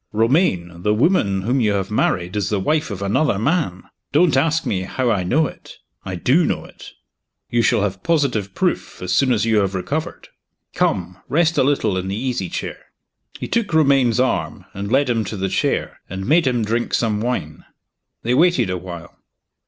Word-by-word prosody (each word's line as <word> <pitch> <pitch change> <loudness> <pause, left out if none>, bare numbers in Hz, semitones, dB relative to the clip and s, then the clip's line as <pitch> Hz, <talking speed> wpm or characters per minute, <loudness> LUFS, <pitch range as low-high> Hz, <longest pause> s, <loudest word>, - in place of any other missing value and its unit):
Romayne! 105 - +1
the 105 +3 +1
woman 105 - +2
whom 125 +5 +1
you 105 -3 +2
have 95 0 -2
married 90 -3 0
is 100 -1 -1
the 105 - 0
wife 150 +10 0
of 100 -2 -5
another 100 +4 +1
man. 115 - 0 0.3
Don't 175 -6 +4
ask 160 +4 +2
me 95 - -1
how 120 +6 -1
I 100 - +1
know 145 - +2
it - - -10 0.3
I 95 - -5
do 130 - +3
know - - -1
it. - - -13 0.6
You 120 - +3
shall 105 - +2
have 95 -2 -3
positive 125 - 0
proof, - - -2
as 90 0 -1
soon 130 +5 +3
as 110 -2 +2
you 110 -1 +2
have 100 -2 +1
recovered. 150 - -4 0.4
Come! 90 0 -1
rest 165 +1 +2
a - - +5
little 115 -9 +1
in 95 - -5
the 95 - -2
easy 120 -7 -2
chair." - - -6 0.5
He - - -4
took 230 -4 -1
Romayne's 135 -6 +3
arm, 130 - -1
and 100 +2 -5
led 135 +2 +3
him 115 -3 +1
to 110 - -5
the 95 0 -1
chair, 95 - -1
and 95 +1 -5
made 160 +1 +3
him 120 -3 +1
drink 115 +2 -1
some 105 -3 0
wine. 110 -11 -3 0.6
They 120 - +1
waited 135 - +3
a 90 - -1
while. 85 -1 -9
110 Hz, 190 wpm, -20 LUFS, 95-140 Hz, 0.6 s, a